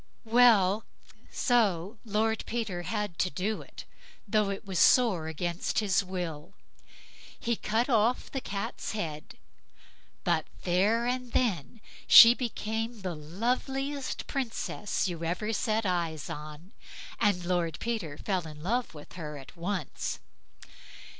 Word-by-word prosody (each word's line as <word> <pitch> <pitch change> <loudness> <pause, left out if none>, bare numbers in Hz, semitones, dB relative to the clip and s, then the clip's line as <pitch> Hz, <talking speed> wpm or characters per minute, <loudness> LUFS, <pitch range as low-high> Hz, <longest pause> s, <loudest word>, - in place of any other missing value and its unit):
Well! 225 -4 +5 0.5
so 210 -4 +1
Lord 220 +1 0
Peter 220 -7 -2
had 205 -1 -3
to 185 - +2
do 200 +4 -2
it, - - -11 0.4
though 210 0 +2
it 200 +2 -5
was 190 -3 -2
sore 205 -11 +4
against 170 +2 -3
his 200 -3 +2
will. 175 -5 -5 0.8
He 235 0 0
cut 225 +3 0
off 235 -1 +2
the 270 - -3
Cat's 200 0 -4
head, 155 -8 -5 0.9
but - - +1 0.2
there 205 +7 +2
and 250 0 -2
then 220 - 0 0.3
she 230 0 +11
became 225 -2 -3
the 185 -2 -3
loveliest 255 - -2
Princess 230 -7 -2
you 170 -2 -4
ever 180 +7 -1
set 220 +1 0
eyes 170 -4 -1
on, 155 +6 -9 0.5
and 200 -5 +2
Lord 175 -3 0
Peter 210 -11 -3
fell 185 -5 -2
in 150 0 -10
love 235 0 -1
with 150 - -12
her 150 -4 -6
at 135 +4 -12
once. 175 -2 -3
200 Hz, 125 wpm, -29 LUFS, 175-230 Hz, 0.9 s, she